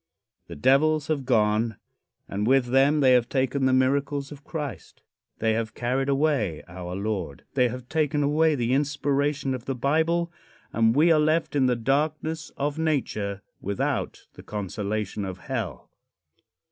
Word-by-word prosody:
The - - -8
devils 150 - +3
have 145 -4 -1
gone, 110 -2 +2 0.5
and 105 +2 -2
with 135 0 +4
them 140 +3 +4
they 130 -2 +5
have 120 -1 +3
taken 135 0 +1
the - - +3
miracles 140 +2 +1
of 145 -1 -11
Christ. 150 -4 -7 0.3
They 110 0 +1
have 110 0 -3
carried 130 +3 -1
away 135 - +1
our 90 0 -7
Lord. 100 -7 -3
They 125 -2 +3
have 125 +1 -7
taken 150 0 0
away 155 +2 +3
the 120 -1 0
inspiration 145 -1 0
of 130 -2 -6
the 135 - -2
Bible, 160 +6 +1 0.4
and 115 0 +3
we 160 +4 +5
are 155 - +5
left 155 +1 +1
in 135 -2 +3
the 125 - +2
darkness 150 +5 -1
of 145 +2 -2
nature 105 -11 -1 0.2
without 100 0 -2
the - - -12
consolation 105 0 -3
of 95 -1 -5
hell. - - -5
135 Hz, 155 wpm, -26 LUFS, 110-150 Hz, 0.5 s, they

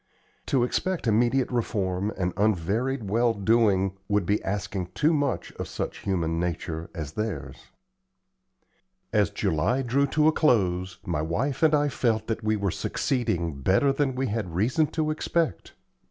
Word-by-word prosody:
To 130 -3 +2
expect 185 +7 -1
immediate 120 +4 +2
reform 100 -4 -1
and 90 -1 -1
unvaried 110 +5 0
well 115 +1 +2
doing 100 -3 +2
would 105 -3 +1
be 100 +4 0
asking 95 -2 -3
too 155 +7 +3
much 145 -3 -1
of - - -3
such - - -4
human 85 -4 -1
nature 85 -1 -3
as 75 -4 -5
theirs. 75 -9 -5 1.5
As 105 -3 +3
July 100 - 0
drew 135 +3 +2
to 150 +2 +2
a - - +6
close, 95 - +1
my 85 -4 -1
wife 125 - -1
and 155 -1 +5
I 145 0 +2
felt 115 -4 0
that 115 -1 -3
we 110 0 +2
were 100 -3 -1
succeeding 85 - -1
better 100 - +3
than 135 -2 0
we 130 +1 0
had 110 -2 -2
had 85 -2 -9
reason 125 - +2
to 155 0 -1
expect. 155 - -1
110 Hz, 155 wpm, -26 LUFS, 90-130 Hz, 1.5 s, a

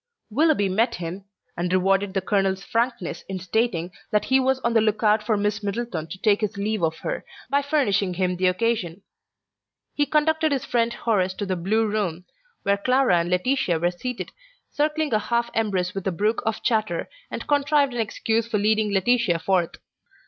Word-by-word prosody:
Willoughby 290 -4 +3
met 220 +6 +1
him, 175 +3 -6 0.3
and 175 +1 -2
rewarded 195 +1 +2
the 195 - +1
colonel's 195 -1 0
frankness 230 -6 -2
in 190 - -3
stating 185 -2 -1 0.2
that 210 - +1
he 265 0 +3
was 265 0 +1
on 235 -1 0
the 225 - +4
look 215 0 0
out 210 0 +4
for 215 0 0
Miss 205 0 -1
Middleton 205 -5 -3
to 165 - -8
take 210 +2 +2
his 210 -1 -2
leave 210 0 -1
of 160 -1 0
her, - - -3 0.3
by 280 0 +3
furnishing 205 - +1
him 180 0 0
the 185 +1 +1
occasion. 185 -2 -1 0.9
He 290 0 +1
conducted 315 +1 +2
his 275 -1 -1
friend 235 -1 +1
Horace 195 -6 0
to 205 - -3
the 190 -1 -1
Blue 210 +6 +1
Room, 195 -5 -2 0.4
where 200 0 +2
Clara 250 -2 +3
and 170 +1 -1
Laetitia 180 0 +1
were 175 +2 +1
seated 250 +7 -5 0.4
circling 300 -1 0
a 215 - +4
half 235 +2 -1
embrace 190 -5 0
with 195 -1 -4
a - - +2
brook 210 +6 0
of 220 0 -2
chatter, 215 -7 0 0.2
and - - -5
contrived 285 -1 +2
an 240 - -3
excuse 225 +1 -1
for 225 - 0
leading 215 +1 +2
Laetitia 200 -2 +2
forth. 175 0 0
210 Hz, 185 wpm, -24 LUFS, 185-235 Hz, 0.9 s, the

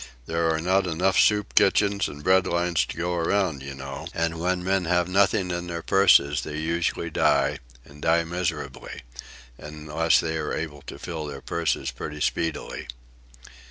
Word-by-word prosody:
There 85 0 0
are 80 - 0
not 95 +3 +1
enough 90 +3 +1
soup 105 -1 +3
kitchens 100 0 +3
and 75 +1 -9
bread 95 +2 +4
lines 85 -1 +1
to - - -7
go 90 +1 -1
around, 85 -3 0
you 70 0 -7
know, 70 0 -7
and 85 0 -1
when 90 +1 -1
men 95 -1 +1
have 90 +1 +2
nothing 95 0 +2
in 85 0 -3
their 85 -1 -5
purses 75 -7 +4
they 75 -1 -6
usually 85 +1 -1
die, - - +2 0.3
and 75 +1 -15
die 85 +1 +3
miserably—unless 75 -2 -3
they 80 0 -2
are - - -3
able 75 -3 -5
to - - -7
fill 80 -3 -5
their 75 - -7
purses 80 -5 -1
pretty 75 +4 -7
speedily." 80 0 -2
85 Hz, 160 wpm, -25 LUFS, 75-90 Hz, 0.3 s, bread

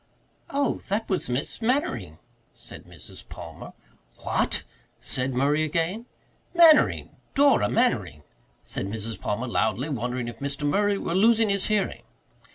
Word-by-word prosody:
"Oh, 280 -1 0
that 210 +3 -1
was 190 -9 -1
Miss 125 - -3
Mannering," 130 - -1 0.4
said - - -12
Mrs. - - -12
Palmer. - - -9 0.5
"What?" - - 0 0.4
said 130 +1 -3
Murray 145 +4 +2
again. 170 - -1 0.5
"Mannering 330 -3 +5 0.2
Dora 280 0 +4
Mannering," 105 - 0 0.4
said - - -4
Mrs. 110 +2 -4
Palmer 105 +5 -2
loudly, 130 +4 0
wondering 125 -2 -2
if 120 -1 -8
Mr. 140 +1 -3
Murray 200 +6 +2
were 170 - -3
losing 220 +3 +4
his 200 -1 +1
hearing. 205 - 0
155 Hz, 130 wpm, -26 LUFS, -, 0.5 s, Mannering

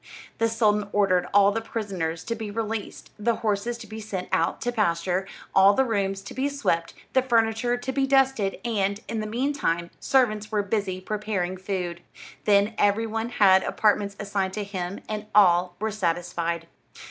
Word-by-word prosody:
The 230 0 +3
sultan 210 -2 +1
ordered 185 -3 +2
all 200 0 +5
the 225 +2 -2
prisoners 190 -8 -3
to 230 - -2
be 220 -2 -5
released, 220 0 -4
the 230 +2 +1
horses 220 +2 -1
to 230 - -10
be 220 +1 -8
sent 200 -4 -5
out 165 - +1
to 245 - -1
pasture, 185 -3 0 0.3
all 195 +1 +6
the 265 - +3
rooms 195 -4 -1
to - - -9
be 270 +2 0
swept, 170 -13 -1 0.2
the 260 - +5
furniture 235 -1 +1
to 245 +2 -4
be 270 0 0
dusted, 265 -7 +2
and, 200 -3 0
in 225 - -3
the 215 - -3
meantime, 225 -8 -1
servants 215 -5 +1
were 210 -1 +1
busy 200 -2 -2
preparing 200 -3 -2
food. 185 -2 -4 0.4
Then 205 +1 +4
every 205 +2 +3
one 225 +1 -3
had 190 -5 +5
apartments 205 -1 +1
assigned 200 -2 -2
to 210 - -3
him, 190 -1 -5
and 210 0 -4
all 180 -3 +5
were 220 +1 -1
satisfied. 170 -3 -2
205 Hz, 170 wpm, -25 LUFS, 190-225 Hz, 0.4 s, all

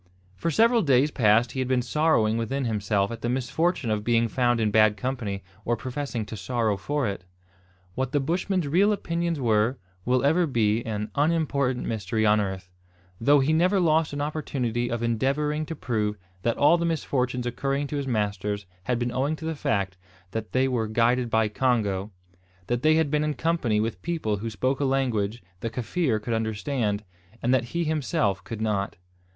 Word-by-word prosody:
For 100 - -2
several 230 +8 +4
days 140 -2 +3
past 115 -1 +3
he 130 - -5
had 130 - 0
been 125 -1 +1
sorrowing 125 -5 +2
within 130 +4 -1
himself 105 -2 0
at 115 -1 -6
the 120 - -1
misfortune 130 +2 0
of 105 -1 -1
being 115 0 +2
found 120 0 +1
in 110 -2 +1
bad 110 -1 +4
company, 105 -4 -3 0.2
or 120 0 0
professing 130 -2 -4
to 110 - -7
sorrow 110 0 0
for 140 +7 -1
it. 100 -2 -4 0.7
What 130 +3 -2
the 145 - +2
Bushman's 175 +3 -1
real 190 +8 +4
opinions 170 -4 -2
were, 115 +1 +2 0.3
will 125 +3 +1
ever 165 +4 +3
be 115 -3 +1
an 105 -1 -3
unimportant 140 -4 +1
mystery 110 0 -1
on 105 0 +4
earth; 95 -2 -5 0.5
though 140 +4 +5
he 145 +4 +2
never 180 +5 +3
lost 160 -2 +2
an 145 0 -3
opportunity 130 -6 -2
of 120 0 -2
endeavouring 145 +6 0
to 165 - -4
prove 105 -6 -1 0.2
that 115 +4 0
all 165 +4 +5
the - - -1
misfortunes 130 -6 -1
occurring 135 +4 -1
to 145 +1 -4
his 140 -1 -3
masters 105 -3 -1 0.2
had 125 -1 +1
been 120 0 -1
owing 135 +5 0
to 160 - -8
the 160 - -1
fact 100 -10 -1 0.3
that 110 0 -4
they 130 +1 +2
were 120 -4 0
guided 120 +2 +2
by 110 -1 +2
Congo, 105 -4 0 0.6
that 120 +4 -1
they 155 +2 +4
had 160 -3 +2
been 150 0 +2
in 150 -1 -1
company 155 -10 +1
with 110 -4 -2
people 155 -12 -1
who 115 +3 -4
spoke 130 +6 -1
a - - 0
language 120 -5 0 0.2
the 115 - -3
Kaffir 125 +1 -1
could 115 +2 -3
understand, 110 -1 -1 0.4
and 125 - +1
that 130 - +2
he 170 +8 -2
himself 130 - 0
could 110 -2 -6
not. 100 -3 -1
120 Hz, 185 wpm, -26 LUFS, 110-145 Hz, 0.7 s, though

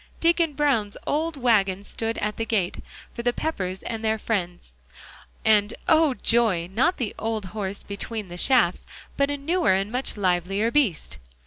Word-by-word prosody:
Deacon 335 -2 +2
Brown's 265 -8 +1
old 315 +1 -1
wagon 200 -6 +2
stood 225 +2 -3
at 210 0 -2
the 225 - -1
gate, 210 -5 0 0.4
for - - -5
the 245 +1 +2
Peppers 190 -11 -3
and 225 -1 -4
their 220 0 +1
friends; 180 - -3 0.7
and, 210 -2 +4
oh! 315 -5 +4
joy, 220 -7 +2
not 255 - +2
the 230 -5 -2
old 220 -2 -2
horse 200 -2 -4
between 205 +1 -5
the 175 - -8
shafts, 205 -3 +2 0.3
but 280 0 +2
a 285 - -1
newer 330 - +2
and 195 +2 -1
much 250 -2 -2
livelier 195 +3 +1
beast. 215 - 0
220 Hz, 160 wpm, -25 LUFS, 195-270 Hz, 0.7 s, and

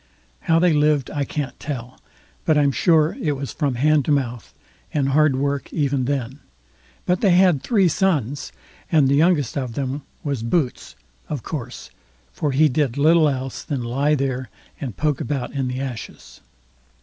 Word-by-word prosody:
How 165 - +2
they 175 0 +4
lived 150 -2 +2
I 145 -2 -1
can't 145 0 -4
tell, 130 -4 -6 0.4
but 155 -2 +3
I'm 145 -1 +3
sure 160 +2 +3
it 150 - +1
was 140 -1 -5
from 140 -5 -1
hand 150 +3 +3
to - - 0
mouth, 125 -5 -1 0.4
and 140 -2 0
hard 150 0 +3
work 140 0 -2
even 140 -4 0
then; 135 0 -3 0.7
but 180 0 +1
they 195 -4 +4
had 180 -6 +4
three 205 -7 +3
sons, 145 - 0 0.4
and 155 -5 +4
the 135 - +2
youngest 150 -3 +2
of 125 -3 -4
them 140 +1 -3 0.2
was 140 -5 -2
Boots, 125 - -1 0.3
of 145 -6 -4
course, 125 -6 -6 0.4
for 145 - -2
he 150 +4 +4
did 140 -2 0
little 155 +1 +5
else 130 -1 -4
than 140 -6 -3
lie 140 +6 +1
there 130 -3 -2 0.3
and 125 -8 -6
poke 150 -3 0
about 130 -1 -3
in 135 -2 -1
the 125 +1 -3
ashes. 120 - -7
140 Hz, 170 wpm, -22 LUFS, 130-155 Hz, 0.7 s, little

